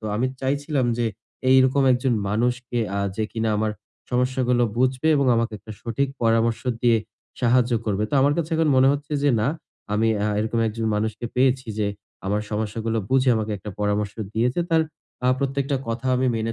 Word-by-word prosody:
তো 110 - -12
আমি 125 - +1
চাইছিলাম 140 0 0
যে 120 - +1 0.4
এইরকম 130 +1 +5
একজন 125 0 +1 0.2
মানুষকে 120 +3 -1 0.2
আ - - 0 0.2
যে 110 - 0
কিনা 115 -1 -1
আমার 110 0 0 0.4
সমস্যাগুলো 125 0 +1 0.2
বুঝবে 130 +4 +2
এবং 140 - +2
আমাকে 115 0 0
একটা 110 +2 -10
সঠিক 125 +4 -1
পরামর্শ 115 0 +2 0.2
দিয়ে 120 -2 +4 0.4
সাহায্য 125 0 +3
করবে। 105 -1 0
তো - - -1
আমার 140 +2 +4
কাছে 165 0 -2
এখন 160 -1 +2
মনে 130 +1 +6
হচ্ছে 145 +1 -5
যে 145 - +4
না 115 - +1 0.4
আমি 110 +2 +2 0.2
আ - - +1
এরকম 110 +2 -1
একজন 110 +1 -3
মানুষকে 110 +2 -2 0.5
যে, 105 - +1 0.4
আমার 105 +2 0
সমস্যাগুলো 110 +1 -2
বুঝে 130 0 +3
আমাকে 110 0 -2
একটা 105 +2 -7
পরামর্শ 105 0 0 0.2
দিয়েছে। 125 +8 +1
তার 160 -1 +4 0.4
আ - - +4
প্রত্যেকটা 140 +1 -1
কথা 115 +3 -3
আমি 130 - +1
মেনে 115 +1 -2
120 Hz, 175 wpm, -23 LUFS, 110-130 Hz, 0.5 s, মনে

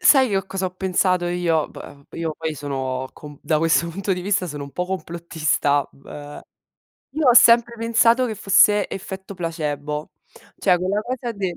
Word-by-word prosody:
Sai, 270 -7 +6
io 195 -1 -1
cosa 190 -1 -3
ho 180 - -5
pensato 185 -1 +1
io 175 -3 0
p - - -18
ehm, 140 0 -13
io 165 -1 -3
poi 160 -1 -3
sono 130 -2 -4
com 145 -1 -12
da 155 -2 +1
questo 165 +1 +2
punto 195 +3 -2
di 180 - -3
vista 185 -1 0
sono 145 -3 -6
un 140 - -9
po' 180 +6 -3
complottista, 160 -5 -1
beh, 145 +1 -11 0.7
io 285 -1 +1
ho 240 - +6
sempre 235 0 +6
pensato 230 +2 +3
che 220 - -4
fosse 205 +1 +4
effetto 190 +1 -7
placebo, 150 -3 -4 0.5
cioè 180 -3 +3
quella 195 +3 -1
cosa 245 -1 -4
de 190 -4 -4
180 Hz, 175 wpm, -22 LUFS, 150-200 Hz, 0.7 s, Sai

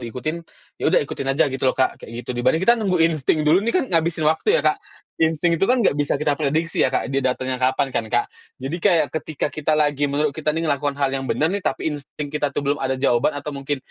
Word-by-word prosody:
diikutin," 125 +7 -4 0.4
ya - - -3
udah 175 - +4
ikutin 140 - -6
aja 135 - +3
gitu 135 - -5
loh - - -1
Kak, 130 - 0
kayak - - -11
gitu. - - -6
Dibanding 120 +7 +1
kita 235 - +6
nunggu 185 -4 +1
insting 155 -1 +1
dulu 165 +6 +4
nih, 230 +3 -1
kan 365 - +2
ngabisin 165 -1 +1
waktu 160 - +3
ya - - +2
Kak. - - +2 0.4
Insting 160 +1 +2
itu 195 - +2
kan 250 -3 +3
nggak - - +4
bisa 145 - +1
kita 150 -1 0
prediksi 155 +3 -1
ya - - +4
Kak, 135 +1 -2
dia 135 - +1
datengnya 130 0 -2
kapan 130 +1 +1
kan, 115 - -1
Kak. 120 +1 +1 0.3
Jadi 135 +6 -4
kayak, 170 -7 +3
ketika 155 -1 -3
kita 155 0 0
lagi 145 -1 +1
menurut 145 +1 0
kita 155 +1 -4
nih 165 +2 0
ngelakukan 145 -1 -1
hal 140 -1 0
yang 135 -1 -3
bener 160 +5 +1
nih 200 - -1
tapi 160 -3 -2
insting 145 0 -7
kita 150 -1 0
tuh 145 - -2
belum 145 +1 0
ada 130 0 -1
jawaban 130 +2 +1
atau 145 +1 -5
mungkin 140 +1 -3
145 Hz, 245 wpm, -22 LUFS, 135-160 Hz, 0.4 s, kita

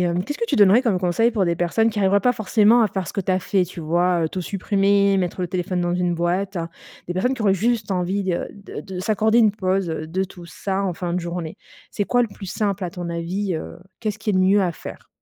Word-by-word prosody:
hem, 175 0 +1
qu'est-ce 290 +10 -5
que - - -1
tu - - 0
donnerais 205 +4 +6
comme 220 -8 +1
conseils 185 +6 +2
pour 210 -5 0
des 170 0 0
personnes 175 +7 +2
qui 220 -2 -3
arriveraient 200 +1 +3
pas 250 +5 +2
forcément 220 +2 +4
à - - +4
faire 190 -3 -4
ce - - -8
que 200 - -1
tu 185 - 0
as 185 - +2
fait, 190 0 +1
tu 175 0 -9
vois, 175 +2 +1
heu? 160 - 0
Tout 185 - -4
supprimer, 200 +1 +2
mettre 185 -1 -2
le 180 - -1
téléphone 180 0 -2
dans 175 0 0
une 180 -1 0
boîte. 180 +3 -1 0.5
Des 175 - -4
personnes 220 +8 +1
qui 260 - -5
auraient 200 -3 +3
juste 215 +1 0
envie 190 +2 -1
de 180 -2 -1
de 200 -1 -9
de 190 -2 -6
s'accorder 220 +3 +2
une 220 -3 +5
pause 190 -2 0
de 160 +3 -2
tout 180 -2 -12
ça 190 +4 -3
en 185 - 0
fin 175 +1 -4
de 180 - 0
journée? 170 -1 -5 0.3
C'est 205 - -1
quoi 245 +4 +2
le 235 - +1
plus 200 0 -11
simple 200 0 -2
à 175 - -3
ton 175 -1 -6
avis, 175 +3 -2
heu, 160 - -6 0.2
qu'est 220 -2 -1
ce 210 - -9
qu'il 215 -2 -1
y - - +2
a - - +3
de 185 - +4
mieux 200 +2 +4
à 185 -2 +1
faire? - - -10
190 Hz, 270 wpm, -22 LUFS, 175-205 Hz, 0.5 s, donnerais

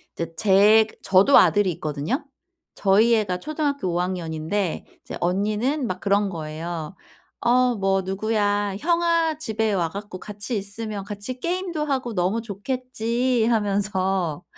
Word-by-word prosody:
제 165 0 -4
제 210 +4 +5
저도 195 +9 +5
아들이 205 -3 +4
있거든요? 155 - -3 0.5
저희 215 +4 +4
애가 195 -5 -1
초등학교 290 - -2
5 175 - 0
학년인데 175 0 -2 0.2
이제 - - -7
언니는 215 - 0
막 185 -2 -4
그런 200 +1 +1
거예요 160 0 -5 0.5
어 250 +1 +3
뭐 195 -1 +1
"누구야. 205 +1 0
형아 335 -1 +1
집에 220 -6 -1
와 175 -4 0
갖고 200 +1 -8
같이 210 +4 -6
있으면 205 +1 -5
같이 205 +5 -6
게임도 345 -1 -2
하고 260 -5 -2
너무 190 +4 0
좋겠지." 240 +2 -1
하면서 195 -6 0
205 Hz, 270 characters per minute, -23 LUFS, 185-240 Hz, 0.5 s, 제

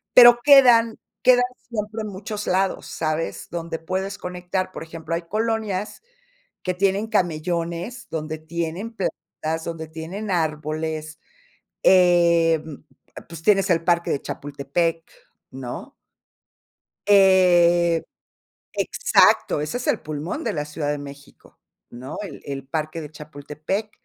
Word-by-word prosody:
pero 240 -1 +9
quedan 245 -6 +7 0.3
quedan 245 -1 +6 0.3
siempre 215 -1 -4
muchos 210 +1 -6
lados, 190 +1 0
¿sabes?, 155 +1 -3
donde 165 -1 -4
puedes 190 +4 -3
conectar, 180 +1 -3
por - - -7
ejemplo, 165 0 -5
hay 170 - -3
colonias 215 0 -2 0.6
que 185 - -1
tienen 195 +3 +1
camellones, 175 +3 -2
donde 155 0 -4
tienen 170 +7 -5
plantas, 160 -4 -4
donde 165 -1 -5
tienen 170 +7 -6
árboles, 155 -1 -2 0.6
em, 170 -4 +4 0.4
pues 165 -2 -9
tienes 195 0 +3
el 165 0 +2
parque 170 0 +1
de 140 - -1
Chapultepec, 145 +4 -2 0.4
¿no? 130 -2 -7 1.2
Eh, 175 -4 +5 0.7
exacto, 145 - +3
ese 155 +11 -3
es 250 - -5
el - - +2
pulmón 155 - -5
de - - -1
la 150 -2 -2
Ciudad 150 0 -4
de 145 - -1
México, 140 0 -13 0.3
¿no?, 130 +5 -8
el 165 -8 -9
el 135 -1 -6
parque 155 +2 -3
de 150 -1 -8
Chapultepec, 155 +7 -5
170 Hz, 120 wpm, -23 LUFS, 155-195 Hz, 1.2 s, pero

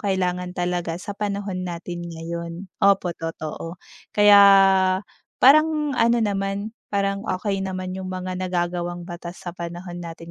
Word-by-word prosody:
kailangan 180 -2 -1
talaga 175 -2 -1
sa 200 +3 -6
panahon 200 -2 -3
natin 175 0 -6
ngayon. 170 +1 -5 0.3
Opo, 195 -3 +3
totoo. 165 +1 -6 0.4
Kaya, 205 -1 +8 1.0
parang 300 +2 +5
ano 235 +1 +4
naman, 200 0 -2 0.2
parang 200 -1 0
okey 195 +1 -1
naman 185 -1 -4
'yong 190 0 -5
mga 185 0 -4
nagagawang 175 -1 -2
batas 175 0 -8
sa 175 - -4
panahon 175 0 -7
natin 165 0 -9
185 Hz, 130 wpm, -23 LUFS, 175-200 Hz, 1.0 s, Kaya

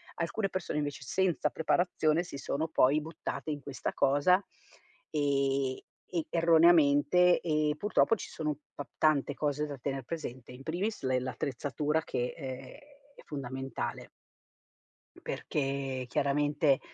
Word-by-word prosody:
Alcune 185 +5 -1
persone, 185 -4 -3
invece, 145 -2 -3
senza 185 +6 +1
preparazione, 160 -1 +1
si 170 -5 -8
sono 150 +3 -2
poi 150 0 +4
buttate 155 0 -5
in 145 - -3
questa 140 -2 -4
cosa, 145 +7 +4 0.7
ehm, 140 -3 +1 0.3
e 170 -3 -1
erroneamente, 165 0 +5
e 150 -2 +1
purtroppo 210 +4 +3
ci - - -8
sono 150 -3 -3 0.2
pap 145 - -7
tante 150 -2 +3
cose 150 +1 -1
da 145 -2 -6
tener 135 +1 -3
presente, 130 -4 -6
in 130 +2 -11
primis 185 +9 -2
le 130 -1 +2
l'attrezzatura 145 +4 -2
che, 125 -4 -2
ehm, 130 -4 -4 0.6
è - - -14
fondamentale. 135 -1 -5 1.1
Perché 135 -2 -2
chiaramente, 145 +1 +2
145 Hz, 125 wpm, -31 LUFS, 135-160 Hz, 1.1 s, erroneamente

